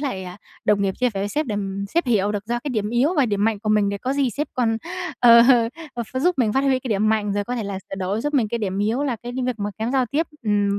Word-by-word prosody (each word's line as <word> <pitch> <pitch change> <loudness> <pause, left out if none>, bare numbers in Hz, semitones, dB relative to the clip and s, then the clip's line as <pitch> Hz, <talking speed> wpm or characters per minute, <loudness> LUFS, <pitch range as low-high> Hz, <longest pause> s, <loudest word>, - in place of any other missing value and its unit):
lại, 255 -10 -3
à, 180 0 -8 0.3
đồng 205 -1 +3
nghiệp, 195 -1 0
chia 250 -1 +3
sẻ 195 - -2
với 200 - -1
sếp 300 +7 -1
để, 225 - -3
ừm, 200 -1 -3
sếp 340 -3 +2
hiểu 210 -4 +2
được 205 0 -4
ra 240 +1 -1
cái - - -2
điểm 215 -4 -1
yếu 255 +9 +2
và 280 -4 +4
điểm 205 -2 0
mạnh 220 -2 +1
của 215 - -4
mình 210 -1 +3
để 200 0 -3
có 255 +6 -2
gì 275 -3 +1
sếp 295 +7 -3
còn, 235 -4 +1 0.4
ờ, 235 -1 +8
ờ, 235 -3 +5 0.3
ờ, 240 - -2
ph 235 +3 -10
giúp 355 +7 +2
mình 225 -5 +2
phát 270 - +2
huy 265 -2 +3
cái 255 - -6
điểm 215 -1 +1
mạnh 215 -2 +1
rồi 205 0 -1
có 245 - -3
thể 230 - -2
là 200 -1 -4
sửa 195 - -9
đổi 190 +3 -2
giúp 295 +4 -2
mình 240 -6 +2
cái 235 - -2
điểm 195 -3 -2
yếu 220 +7 0
là 265 -5 -1
cái 240 0 -6
đ 255 - -5
việc 250 -3 -2
mà 205 0 -2
kém 225 +3 -2
giao 260 -2 +2
tiếp, 295 +7 -1 0.2
ừm, 205 -2 +1
225 Hz, 325 wpm, -22 LUFS, 205-255 Hz, 0.4 s, ờ